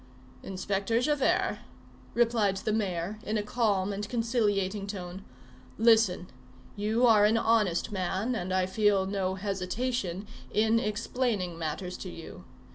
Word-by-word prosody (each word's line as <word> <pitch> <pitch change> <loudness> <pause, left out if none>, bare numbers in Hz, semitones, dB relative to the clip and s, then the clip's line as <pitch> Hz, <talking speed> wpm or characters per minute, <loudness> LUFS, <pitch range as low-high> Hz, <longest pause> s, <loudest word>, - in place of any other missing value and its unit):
"Inspector 195 +3 -1
Javert," 290 +1 +1 0.6
replied 225 -5 +2
the 215 +2 -1
mayor, 195 -1 -2
in 215 +1 -2
a 210 - -1
calm 205 -3 0
and 205 +1 -4
conciliating 210 -4 0
tone, 190 -1 -6 0.5
"listen. 220 -5 +4 0.5
You 220 +4 +1
are 220 -3 +6
an 215 +2 +4
honest 220 -5 +2
man, 190 +4 -1
and 185 -5 -3
I 185 0 +2
feel 200 0 +2
no 190 -1 -1
hesitation 195 0 -2 0.3
in 220 +2 +3
explaining 215 -4 -1
matters 165 +3 -4
to 185 - -7
you. 165 -2 -10
205 Hz, 125 wpm, -29 LUFS, 185-225 Hz, 0.6 s, are